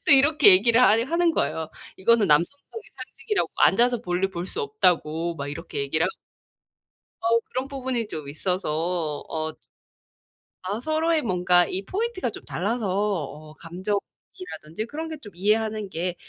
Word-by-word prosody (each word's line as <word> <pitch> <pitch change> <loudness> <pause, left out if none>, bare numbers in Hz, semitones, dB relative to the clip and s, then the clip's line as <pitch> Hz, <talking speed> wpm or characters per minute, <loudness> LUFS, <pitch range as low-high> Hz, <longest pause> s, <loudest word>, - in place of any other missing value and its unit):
또 - - +4
이렇게 275 -3 +7
얘기를 230 +6 +5
아예 225 -2 +5
하는 335 +4 +2
거예요. 160 - -1 0.3
이거는 220 +2 +3
남성성의 280 - 0
상징이라고 420 -3 -3
앉아서 245 0 +4
볼일 180 +2 -1
볼 175 0 -5
수 455 - -4
없다고 170 - 0
막 140 0 -5
이렇게 145 - -6
얘기를 155 +4 0
하 - - -1 1.1
어 230 +1 +3
그런 260 +2 -3
부분이 260 -5 -3
좀 155 -7 -7
있어서 165 -1 -2
어 155 0 -3
즈 - - -33 1.0
아 205 +5 -3
서로의 315 +2 +1
뭔가 180 -4 +3
이 190 +1 -4
포인트가 405 - -2
좀 - - -10
달라서 215 +3 -2
어 170 -6 -2
감정이라든지 190 - -6
그런 320 +4 -5
게 320 - -5
좀 205 - -11
이해하는 215 +2 0
게 175 +1 -3
200 Hz, 320 characters per minute, -25 LUFS, 170-255 Hz, 1.1 s, 이렇게